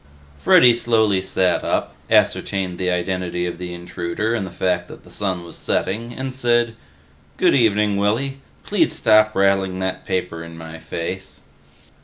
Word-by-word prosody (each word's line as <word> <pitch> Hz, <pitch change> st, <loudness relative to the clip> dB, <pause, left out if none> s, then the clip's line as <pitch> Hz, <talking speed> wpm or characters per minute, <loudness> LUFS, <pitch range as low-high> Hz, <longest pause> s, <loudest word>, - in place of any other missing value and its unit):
Freddy 120 Hz, -, +6 dB
slowly 110 Hz, -5 st, +2 dB
sat 95 Hz, -1 st, 0 dB
up, -, -, -1 dB, 0.2 s
ascertained 95 Hz, -3 st, +1 dB
the 90 Hz, -1 st, 0 dB
identity 90 Hz, 0 st, -1 dB
of 85 Hz, -1 st, -5 dB
the 90 Hz, -1 st, -5 dB
intruder 85 Hz, +5 st, -3 dB
and 105 Hz, -5 st, -2 dB
the -, -, -7 dB
fact 90 Hz, -1 st, -1 dB
that -, -, -12 dB
the -, -, -16 dB
sun 95 Hz, -4 st, -2 dB
was 85 Hz, -, -10 dB
setting, 115 Hz, +5 st, -2 dB
and 130 Hz, +1 st, -5 dB
said, 120 Hz, -2 st, +2 dB, 0.6 s
"Good -, -, +4 dB
evening, 105 Hz, -4 st, +3 dB
Willy. 120 Hz, +7 st, 0 dB, 0.2 s
Please -, -, +2 dB
stop 110 Hz, 0 st, +4 dB
rattling 95 Hz, -1 st, +2 dB
that 95 Hz, 0 st, -3 dB
paper 90 Hz, -3 st, -3 dB
in 85 Hz, 0 st, -10 dB
my 80 Hz, 0 st, -9 dB
face." 95 Hz, +4 st, -6 dB
95 Hz, 155 wpm, -21 LUFS, 90-110 Hz, 0.6 s, Freddy